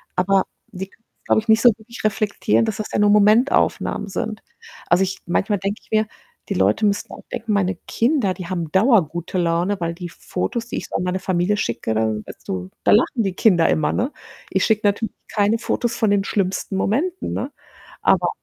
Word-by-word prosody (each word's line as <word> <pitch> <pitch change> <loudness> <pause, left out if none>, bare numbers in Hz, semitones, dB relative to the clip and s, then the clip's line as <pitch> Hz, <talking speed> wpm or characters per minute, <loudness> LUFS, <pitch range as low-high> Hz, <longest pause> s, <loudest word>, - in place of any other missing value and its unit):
aber 190 +1 +3 0.2
die 190 +1 -7
können's, 225 - -28 0.2
glaube - - +3
ich, 220 - -18
nicht 220 +1 +5
so 245 - +8
wirklich 230 +2 -11
reflektieren, 215 +1 +1
dass 220 - -2
das 215 - -5
ja - - +1
nur 210 0 +4
Momentaufnahmen 210 +1 +3
sind. 215 +2 -4 0.5
Also, 175 +3 +4
ich 190 0 -3
manchmal 195 +3 0
denke 200 +2 -3
ich - - -28
mir, 215 0 +2 0.4
die - - 0
Leute 215 - +2
müssen 205 0 0
auch - - -11
denken, 220 -1 -3
meine 195 -1 +1
Kinder, 235 -5 +1
die 180 -2 -8
haben 170 -4 -3
dauergute 185 - +2
Laune, 175 +3 +1
weil 170 0 -1
die 175 0 -7
Fotos, 230 +7 -4
die - - -4
ich - - -5
so - - -7
an - - 0
meine 180 +1 -1
Familie 185 +3 0
schicke, 115 - -2
da 110 0 +1 0.3
so 95 0 -5 0.2
da - - +5
lachen 230 +1 +3
die 195 - -1
Kinder 180 -4 +4
immer, 155 - +1
ne? 255 +5 -1 0.4
Ich - - +1
schicke 215 -2 +2
natürlich 205 +2 -1
keine 210 +2 +1
Fotos 240 0 -1
von 220 -3 +2
den 200 -1 +2
schlimmsten 195 -1 -1
Momenten, 320 - -1
ne? - - -3 0.5
Aber - - +3
200 Hz, 200 wpm, -21 LUFS, 180-220 Hz, 0.5 s, so